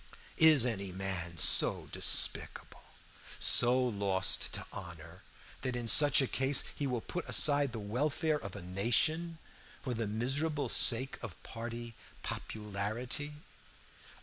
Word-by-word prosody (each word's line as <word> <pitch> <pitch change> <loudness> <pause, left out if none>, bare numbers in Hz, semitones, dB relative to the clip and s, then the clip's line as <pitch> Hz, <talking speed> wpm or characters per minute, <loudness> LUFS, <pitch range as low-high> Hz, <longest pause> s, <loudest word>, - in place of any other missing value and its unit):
Is 155 -6 +6
any 100 -6 -3
man 90 -2 -5
so - - +3
despicable, - - +1 0.6
so 125 +1 +5
lost 100 -5 +1
to - - -4
honor, 85 -2 -10 0.4
that 130 -2 -3
in 120 -1 -5
such 145 +2 +6
a - - -2
case 135 +2 +1
he 145 - -3
will 125 -3 -3
put 170 -1 -7
aside 145 0 +2
the 115 - -7
welfare 145 +8 -2
of 100 -1 -9
a 100 - -8
nation 125 - -1 0.5
for 130 - -4
the 115 -2 -3
miserable 135 +6 -2
sake 130 +4 +2
of 110 -8 -8
party 115 0 -8 0.3
popularity? 110 +7 -5
120 Hz, 125 wpm, -31 LUFS, 100-140 Hz, 0.6 s, Is